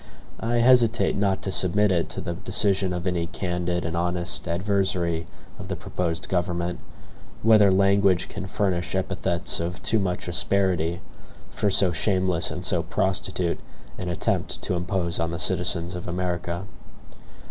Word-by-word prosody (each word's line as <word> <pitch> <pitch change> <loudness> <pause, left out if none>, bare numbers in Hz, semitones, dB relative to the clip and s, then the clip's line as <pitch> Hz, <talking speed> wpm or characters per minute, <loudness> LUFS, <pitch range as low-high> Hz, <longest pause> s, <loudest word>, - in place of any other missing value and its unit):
I 115 +1 -1
hesitate 120 -1 +4
not 100 -1 0
to 95 - -2
submit 100 +3 +4
it 85 -2 0
to - - -4
the 85 - -4
decision 95 +1 +1
of 90 0 -4
any 90 -2 -1
candid 90 -1 -2
and 85 +1 -2
honest 85 0 0
adversary 90 -2 0 0.3
of - - -7
the - - -3
proposed 80 -4 -3
government, 90 -1 -1 0.6
whether 110 -2 +6
language 100 -1 +3
can 95 0 -6
furnish 90 -3 -1
epithets 90 -2 0
of 85 +2 -3
too 110 - +2
much 90 -3 -2
asperity, 90 -2 0 0.5
for 105 - 0
so 95 -2 +5
shameless 95 0 +1
and 90 +4 -5
so 90 -1 +1
prostitute 90 0 -1 0.4
an 90 - -3
attempt 85 - -1
to - - 0
impose 90 -1 -1
on 80 0 0
the 85 - -4
citizens 85 0 0
of 90 0 -6
America. 85 0 -3
90 Hz, 145 wpm, -25 LUFS, 85-95 Hz, 0.6 s, whether